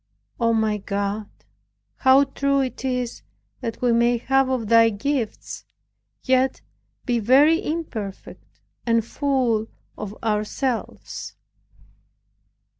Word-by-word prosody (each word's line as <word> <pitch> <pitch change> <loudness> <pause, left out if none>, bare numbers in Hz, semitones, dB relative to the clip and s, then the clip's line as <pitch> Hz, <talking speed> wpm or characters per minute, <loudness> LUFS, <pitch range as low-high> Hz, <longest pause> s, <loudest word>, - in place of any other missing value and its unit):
O, 230 -1 +3
my 220 -2 +1
God, 200 +1 -3 0.7
how 265 +1 +6
true 275 0 0
it 260 0 -4
is 250 -2 -2 0.4
that 235 -1 -5
we 245 - +4
may 235 +1 +3
have 270 +2 +2
of 250 -4 -1
Thy 230 +1 +6
gifts, 230 +2 -3 0.6
and - - -23
yet 260 0 +2 0.4
be 240 -2 +1
very 290 - +5
imperfect, 235 - -6 0.2
and 230 -2 +2
full 245 -5 0 0.3
of 210 0 -7
ourselves! 225 +3 -3
240 Hz, 110 wpm, -23 LUFS, 220-265 Hz, 0.7 s, how